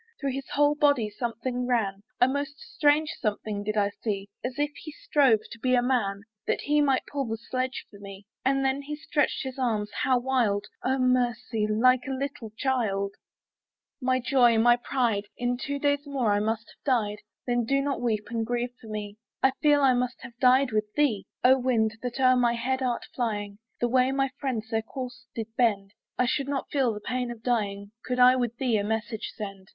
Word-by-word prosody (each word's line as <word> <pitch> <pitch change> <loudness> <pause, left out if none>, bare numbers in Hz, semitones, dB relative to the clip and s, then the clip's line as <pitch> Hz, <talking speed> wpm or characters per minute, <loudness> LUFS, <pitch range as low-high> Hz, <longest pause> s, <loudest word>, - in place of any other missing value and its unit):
Through 275 -1 -1
his 270 +1 -5
whole 290 0 +3
body 285 -8 +2
something 245 +2 -3
ran, 205 -6 0 0.2
A 250 - +6
most 285 +2 -2
strange 300 +1 +2
something 210 -2 -2
did 215 +1 -2
I 205 -1 +2
see; 200 -3 -3
As 250 +1 -4
if 295 0 0
he 310 - -9
strove 275 -7 +3
to 230 - -9
be 255 +2 +2
a 245 - +3
man, 200 -6 0 0.2
That - - 0
he 295 +1 +2
might 275 -3 +2
pull 280 -1 -3
the 225 0 -2
sledge 255 +3 -3
for 200 - -14
me. 200 0 -10 0.2
And 270 +1 +2
then 265 +1 +1
he 300 +2 -5
stretched 295 -1 0
his 265 0 -6
arms, 215 -5 0
how 260 -1 +3
wild! 240 -6 +1 0.2
Oh 265 +1 +1
mercy! 245 -4 +1
like 250 +4 +3
a 270 - -2
little 270 -4 -4
child. 205 -7 0 0.9
My 255 0 +2
little 255 -1 -3
joy! 245 -4 +5
my 235 +2 +5
little 240 0 +2
pride! 230 -6 0
In 245 0 0
two 280 +3 -3
days 285 0 0
more 255 -7 +1
I 205 - +2
must 220 +2 -2
have - - -50
died. 215 -6 +1 0.3
Then 240 -1 +1
do 275 +4 +1
not 275 -1 -1
weep 220 -3 0
and 230 -1 -1
grieve 240 +1 -2
for 225 - -12
me; 210 -1 -5 0.3
I 265 - +6
feel 295 -1 +5
I 265 -2 +6
must 250 0 -1
have 235 0 -10
died 255 0 +5
with 215 -1 -1
thee. 275 -9 +1 0.2
Oh 260 +1 +6
wind 225 -3 +1
that 245 +1 -4
o'er 255 -1 +5
my 240 -1 +3
head 260 +3 -1
art 245 -2 -1
flying, 205 -4 -3 0.2
The 240 - +2
way 255 +1 +3
my 270 0 +1
friends 230 -6 -3
their 225 0 +1
course 250 +1 -8
did 225 0 -5
bend, 205 -5 +1 0.2
I 250 - +3
should 275 +2 0
not 280 -1 -3
feel 265 -5 +2
the 210 -1 -6
pain 250 +2 -2
of 235 -2 -8
dying, 200 -4 -1
Could 250 0 -2
I 250 +1 +7
with 240 -2 -1
thee 245 -4 +1
a 200 - 0
message 220 +1 -3
send. 195 -3 -7
245 Hz, 210 wpm, -27 LUFS, 220-265 Hz, 0.9 s, I